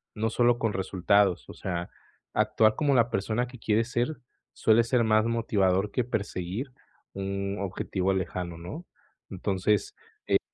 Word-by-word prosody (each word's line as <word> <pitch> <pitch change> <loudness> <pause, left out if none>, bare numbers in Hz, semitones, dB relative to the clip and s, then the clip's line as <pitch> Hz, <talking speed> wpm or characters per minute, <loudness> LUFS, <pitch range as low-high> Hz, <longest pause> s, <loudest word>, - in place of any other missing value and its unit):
no 110 +1 0
solo 120 0 +3
con 115 -3 0
resultados, 95 0 +2
o - - -7
sea, 85 -2 -4 0.4
actuar 110 0 +3
como 140 0 +2
la 120 0 +3
persona 110 +5 0
que 125 -1 -12
quieres 115 +2 +1
ser, 120 +6 0 0.4
suele 115 +1 +4
ser 120 +1 +2
más 110 0 +3
motivador 100 -4 +1
que 125 - 0
perseguir 105 +1 -3 0.4
un 100 0 -3
objetivo 95 -1 -1
lejano, 90 -2 -3
¿no? 120 - -8 0.4
Entonces, 95 +2 0 0.3
eh, - - +4
105 Hz, 140 wpm, -28 LUFS, 95-115 Hz, 0.4 s, suele